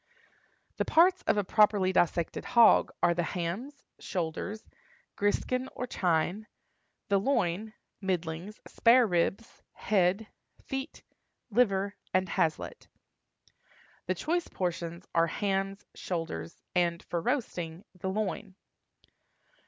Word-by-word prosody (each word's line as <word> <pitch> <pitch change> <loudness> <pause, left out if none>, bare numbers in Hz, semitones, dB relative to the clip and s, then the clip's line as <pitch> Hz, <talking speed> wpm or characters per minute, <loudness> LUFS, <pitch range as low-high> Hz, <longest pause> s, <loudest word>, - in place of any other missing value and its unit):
The - - 0
parts 360 +3 +5
of - - +3
a 205 - +2
properly 200 -2 +3
dissected 170 -1 +1
hog 235 -2 +6
are 170 - +5
the 175 - 0
hams, 190 - -4 0.2
shoulders, 180 +5 -4 0.5
griskin 255 +5 0
or 250 - -3
chine, 180 0 0 0.6
the 200 -1 +4
loin, 215 -3 0 0.3
middlings, 180 +1 -3
spare 245 +1 +5
ribs, 190 +3 -1
head, 195 +1 +1 0.4
feet, 270 +2 -5 0.5
liver, 200 -3 +2 0.2
and 185 0 +2
haslet. 160 -2 -1 1.2
The - - +1
choice 345 +2 -1
portions 170 -1 -4
are 165 0 +4
hams, 195 +2 -2
shoulders, 160 - -5
and, 175 -1 +1
for 170 - -3
roasting, 175 - -2
the 185 +1 -4
loin. 200 -1 -3
190 Hz, 105 wpm, -30 LUFS, 175-220 Hz, 1.2 s, hog